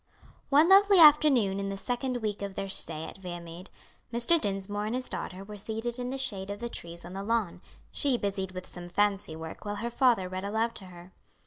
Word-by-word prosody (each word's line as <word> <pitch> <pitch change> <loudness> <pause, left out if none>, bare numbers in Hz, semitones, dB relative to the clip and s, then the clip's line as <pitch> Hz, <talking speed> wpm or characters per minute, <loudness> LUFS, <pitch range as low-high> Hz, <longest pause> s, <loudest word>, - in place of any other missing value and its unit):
One 295 +4 +6
lovely 395 +1 +7
afternoon 290 - +6
in 195 0 -3
the 195 - -4
second 245 +2 -2
week 210 -2 -2
of 200 -1 -5
their 195 - -3
stay 160 -4 +1
at - - -10
Viamede, 175 0 -8 0.4
Mr. 240 +8 +2
Dinsmore 205 +1 -2
and 225 - -2
his 255 0 -3
daughter 185 +1 -6
were 210 +1 -9
seated 225 +4 -4
in 245 0 -3
the 270 - -3
shade 200 -8 -1
of 205 - -4
the 235 +1 -4
trees 170 -5 -7
on 180 - -9
the 195 - -5
lawn, 215 -3 -1 0.3
she 275 -4 +1
busied 195 -3 -3
with 185 0 -7
some 175 -1 -9
fancy 200 -3 0
work 160 0 -8
while 205 -1 -4
her 235 +3 -4
father 240 -7 +3
read 185 +1 -5
aloud 220 +3 -1
to 195 - -9
her. 180 0 -13
205 Hz, 215 wpm, -29 LUFS, 190-240 Hz, 0.4 s, lovely